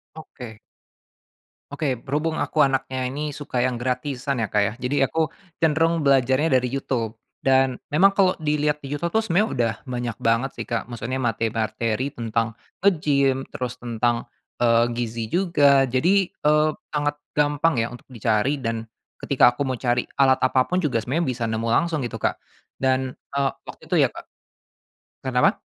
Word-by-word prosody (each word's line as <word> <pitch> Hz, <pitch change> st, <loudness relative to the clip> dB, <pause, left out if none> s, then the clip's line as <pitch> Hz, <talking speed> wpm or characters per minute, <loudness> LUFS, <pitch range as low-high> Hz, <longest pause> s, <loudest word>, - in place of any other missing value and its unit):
Oke. 125 Hz, -8 st, -10 dB, 1.1 s
Oke. 145 Hz, -2 st, -1 dB
Berhubung 150 Hz, +6 st, -2 dB
aku 150 Hz, -2 st, +3 dB
anaknya 130 Hz, -1 st, -1 dB
ini 150 Hz, +4 st, -3 dB
suka 140 Hz, -4 st, -3 dB
yang 125 Hz, -2 st, 0 dB
gratisan 125 Hz, +1 st, -2 dB
ya, 110 Hz, -, -2 dB
Kak, 105 Hz, -1 st, +2 dB
ya, -, -, -2 dB
jadi 130 Hz, +3 st, 0 dB
aku 160 Hz, +1 st, -1 dB, 0.3 s
cenderung 165 Hz, +1 st, +2 dB
belajarnya 135 Hz, +2 st, +3 dB
dari 125 Hz, -, -1 dB
YouTube. 125 Hz, -3 st, -2 dB, 0.3 s
Dan 130 Hz, -1 st, +3 dB
memang 190 Hz, +7 st, +4 dB
kalau 190 Hz, -2 st, +3 dB
dilihat 150 Hz, -1 st, 0 dB
di 135 Hz, -, -6 dB
YouTube 160 Hz, +4 st, -1 dB
tuh 220 Hz, -, +4 dB
sebenernya 205 Hz, +3 st, +2 dB
udah 115 Hz, -2 st, +1 dB, 0.2 s
banyak 120 Hz, -2 st, -3 dB
banget 115 Hz, +4 st, +1 dB
sih, -, -, -4 dB
Kak, -, -, -1 dB
maksudnya 120 Hz, +2 st, -4 dB
materi-materi 115 Hz, +2 st, -1 dB
tentang 115 Hz, -1 st, -1 dB, 0.3 s
ngegim 140 Hz, -7 st, +2 dB
terus 125 Hz, -1 st, -5 dB
tentang, 120 Hz, 0 st, -1 dB, 0.3 s
eee, 115 Hz, -1 st, +4 dB
gizi 115 Hz, -1 st, -3 dB
juga. 145 Hz, -7 st, +4 dB
Jadi, 175 Hz, +10 st, +2 dB
eee, 150 Hz, +1 st, +3 dB, 0.2 s
sangat 145 Hz, -1 st, 0 dB, 0.2 s
gampang 150 Hz, +2 st, +2 dB
ya 115 Hz, -, +1 dB
untuk 120 Hz, 0 st, -11 dB
dicari 115 Hz, +5 st, 0 dB
dan 115 Hz, -2 st, -3 dB, 0.4 s
ketika 125 Hz, -3 st, +4 dB
aku -, -, 0 dB
mau 130 Hz, -2 st, -2 dB
cari 120 Hz, 0 st, +1 dB, 0.2 s
alat 130 Hz, -1 st, +6 dB
apa 130 Hz, -, +3 dB
pun 180 Hz, +1 st, 0 dB
juga 130 Hz, -6 st, +1 dB
semuanya 135 Hz, +10 st, -1 dB
bisa 120 Hz, -1 st, -4 dB
nemu 110 Hz, +1 st, -2 dB
langsung 160 Hz, +3 st, +1 dB
gitu, 115 Hz, -1 st, -5 dB
Kak. -, -, 0 dB, 0.4 s
Dan, 130 Hz, -1 st, 0 dB, 0.2 s
eee, 140 Hz, -1 st, +1 dB
waktu -, -, -11 dB
itu -, -, +1 dB
ya, -, -, +3 dB
Kak -, -, -10 dB, 1.0 s
kenapa? -, -, +2 dB
130 Hz, 160 wpm, -23 LUFS, 120-150 Hz, 1.1 s, alat